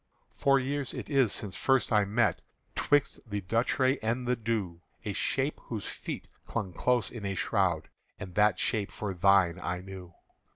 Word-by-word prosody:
"Four 140 0 +3
years 135 0 -2
it - - -6
is 135 -7 +4
since 100 -3 -1
first 135 -1 +2
I 105 -1 +5
met, 110 +2 +1 0.3
'Twixt 145 -1 +2
the 100 0 -2
Duchray 125 +7 +1
and 120 +3 -1
the 125 - +3
Dhu, 105 -7 -2 0.2
A - - -2
shape - - -1
whose - - -4
feet - - -5 0.2
clung 100 -6 -3
close 125 +2 +1
in 115 -4 -7
a 100 -1 -2
shroud, 90 -7 +1 0.3
And 95 -2 -7
that 105 +2 +4
shape 105 -4 0
for 100 -2 -4
thine 90 -1 +4
I 90 0 -3
knew. 95 -2 -10
105 Hz, 170 wpm, -30 LUFS, 95-125 Hz, 0.3 s, I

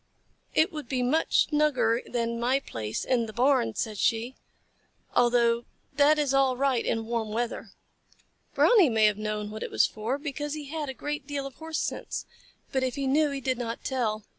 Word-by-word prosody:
"It 315 - +4
would 300 -6 -7
be 255 -2 0
much 300 +6 +3
snugger 260 -6 +2
than 235 -1 -2
my 255 +3 +2
place 110 - -5
in 235 -3 +1
the 220 - -8
barn," 245 - +2
said 215 -3 -3
she, 230 +2 +1 0.8
"although 235 -1 +3 0.3
that 290 +2 +4
is 290 -3 +1
all 270 -2 +3
right 265 -3 +1
in 225 0 -1
warm 230 -1 -2
weather." 235 +2 -3 0.9
Brownie 415 - +6
may 220 -2 +3
have 210 -1 +2
known 210 -1 -3
what 215 - -7
it - - -3
was - - +3
for, 225 +5 -3
because 295 0 -4
he 305 - -6
had 305 -2 -3
a 265 - -5
great 295 0 -4
deal 285 -2 -3
of 275 - -7
Horse 320 +3 -5
sense, - - -3 0.5
but 265 - 0
if 260 -1 -1
he 280 -1 -2
knew 295 +3 +3
he 280 -1 -4
did 260 -1 -1
not 230 -1 -4
tell. 220 -5 -1
255 Hz, 190 wpm, -27 LUFS, 230-285 Hz, 0.9 s, Brownie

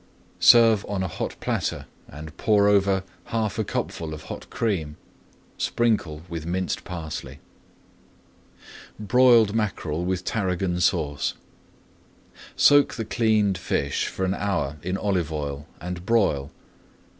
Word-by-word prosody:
Serve 115 -3 +6
on 100 -2 -1
a - - -1
hot 80 - -4
platter - - -2 0.2
and 75 +2 -10
pour 105 -2 +3
over 100 -1 +3 0.2
half 110 -3 -2
a - - +2
cupful 80 -2 -4
of 75 - -11
hot - - -8
cream. 85 -10 -2 0.6
Sprinkle 105 -10 0
with 85 -2 -5
minced 90 +3 -2
parsley. 80 -6 -6 1.6
BROILED 115 0 +5
MACKEREL 90 -7 -2
WITH 90 0 -2
TARRAGON 90 -4 -1
SAUCE 75 -3 0 1.2
Soak 145 0 +5
the 115 - -4
cleaned 105 -4 +1
fish 70 -4 -1
for 95 - -3
an 95 - 0
hour 90 -8 -2
in 90 +4 -2
olive 90 -7 -1
oil, 75 -1 -4
and 90 +1 -6
broil. 95 -11 +1
95 Hz, 120 wpm, -24 LUFS, 80-105 Hz, 1.6 s, Serve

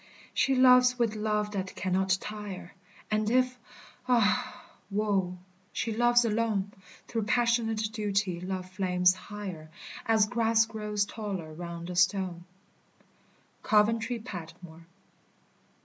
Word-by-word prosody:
"She 270 - +2
loves 250 -1 +6
with 230 -3 +1
love 210 -1 -1
that 190 -2 -4
cannot 185 0 +1
tire: 210 -4 -7 0.4
And 215 0 +1
if, 255 +1 +2 0.5
ah, 250 +1 +1 0.2
woe! 195 -3 0 0.4
she 225 - -2
loves 240 +1 +4
alone, 215 -3 0 0.4
Through 225 -3 -2
passionate 225 -2 +1
duty 200 -5 -1
love 185 0 -4
flames 185 -1 +2
higher, 185 -5 -8 0.4
As 220 -2 +4
grass 225 0 +2
grows 210 -2 -2
taller 200 -7 -5
round 170 +1 -6
a - - -5
stone." 180 -1 +1 1.2
COVENTRY 225 +3 +2
PATMORE. 170 -5 -10
210 Hz, 110 wpm, -29 LUFS, 185-230 Hz, 1.2 s, loves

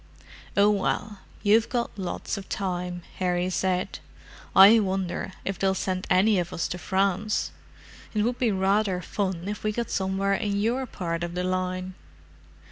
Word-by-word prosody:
"Oh, 205 +1 +6
well, 205 +1 -1 0.2
you've 220 +2 +4
got 240 -2 -2
lots 190 -2 -3
of 200 -2 -8
time," 180 -3 -3 0.2
Harry 180 0 0
said. 185 0 -1 0.6
"I 205 +4 +9
wonder 190 -2 -2
if 195 - -3
they'll 190 -1 +2
send 185 -1 -2
any 190 +2 +4
of 175 -1 -3
us 165 - -1
to 180 - -4
France—it 200 +2 -2
would 240 +2 -1
be 240 -4 +2
rather 195 0 +1
fun 190 -3 -2
if 210 +1 -4
we 215 - +1
got 235 +1 -3
somewhere 195 +1 0
in 200 0 0
your 245 +5 0
part 170 -5 -3
of 175 0 -4
the 180 - -1
line." 185 0 -2
190 Hz, 155 wpm, -26 LUFS, 185-210 Hz, 0.6 s, I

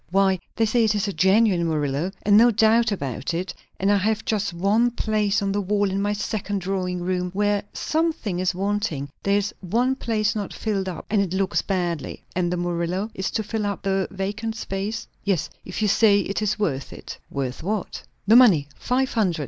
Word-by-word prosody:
Why, 190 0 +3 0.2
they 225 - +2
say 230 +2 +2
it 220 -1 +2
is 205 0 0
a 200 - -2
genuine 190 -2 +3
Murillo, 150 +1 -1
and 205 0 +4
no 235 +3 +7
doubt 225 +1 +3
about 140 - -3
it; 180 +2 -3 0.3
and 195 +2 +2
I 205 - +4
have 215 +3 0
just 210 -2 0
one 200 +7 +2
place 215 -3 0
on 195 - 0
the 205 +1 0
wall 200 0 +1
in 195 +1 -1
my 205 +1 0
second 205 -1 -3
drawing 180 -1 -2
room, 180 0 -1
where 205 0 +2
something 315 - -1
is 185 -1 0
wanting; 195 -8 -2
there 200 0 +2
is 205 +1 -1
one 235 +8 +1
place 220 -5 0
not 205 -2 -4
filled 195 -4 -2
up, 175 - -7
and 210 -2 +3
it 190 -2 -2
looks 190 +1 +1
badly." 175 -6 -3
"And 175 -1 0
the 180 - -1
Murillo 175 +4 -2
is 190 - -2
to 220 - -2
fill 215 0 -2
up 200 - -4
the 195 -1 0
vacant 205 +4 -3
space?" 210 +1 -4 0.2
"Yes. 195 -6 0
If 185 +3 -4
you - - +3
say 205 0 +5
it 200 +2 -3
is 210 0 0
worth 145 -11 -2
it." - - -9
"Worth 130 -2 -3
what?" 205 +3 -3 0.2
"The 215 +3 +6
money. 185 - +6
Five 260 +1 0
hundred. 185 -8 +1
200 Hz, 205 wpm, -24 LUFS, 180-215 Hz, 0.3 s, no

